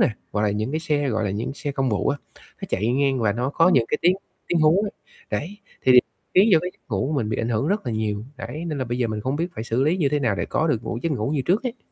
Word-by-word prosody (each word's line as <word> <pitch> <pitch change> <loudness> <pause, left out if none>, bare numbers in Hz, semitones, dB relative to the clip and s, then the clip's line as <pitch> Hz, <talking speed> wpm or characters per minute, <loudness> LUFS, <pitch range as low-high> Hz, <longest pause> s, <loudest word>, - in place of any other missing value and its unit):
nè, - - +5 0.2
gọi 105 0 +1
là, 105 - +2
những 105 +5 -2
cái 155 - -1
xe, 145 -3 0
gọi 110 -3 0
là, 100 - 0
những 105 +7 -3
xe 145 0 -4
công 135 -1 0
vụ 100 - 0
á, 145 - 0 0.4
nó - - -3
chạy 105 +4 0
ngang 135 0 +2
và 105 -2 +2
nó 125 +5 -1
có 165 +4 +4
những 125 -10 +4
cái - - 0
tiếng 180 +2 +4 0.3
tiếng 175 -2 +2
hú, 165 +7 +4 0.5
đấy, 160 - -3 0.3
thì 130 - +6 0.4
khiến 195 +5 +6
cho 165 - +8
cái 180 +2 -3
giấc - - -31
ngủ 105 +6 0
của 155 - -2
mình 120 -8 0
bị - - -1
ảnh 115 - -1
hưởng 115 +5 0
rất 205 -4 0
là 120 - -1
nhiều, 110 -1 -2
đấy, 155 +3 -6
nên 150 -4 -3
là 130 - -1
bây 120 +1 -3
giờ 120 - +2
mình 110 -1 -3
không 130 +5 -1
biết 165 +3 0
phải 110 - -5
xử 115 +2 0
lý 160 +4 +2
như 160 -7 +2
thế 150 +1 +1
nào 115 -6 +1
để - - -2
có 160 - 0
được 120 -8 0
ngủ 115 - -3
giấc 165 - 0
ngủ 115 -1 -1
như 145 -3 0
trước 190 +8 +2
ấy. 250 0 -3
135 Hz, 310 wpm, -23 LUFS, 110-160 Hz, 0.5 s, cho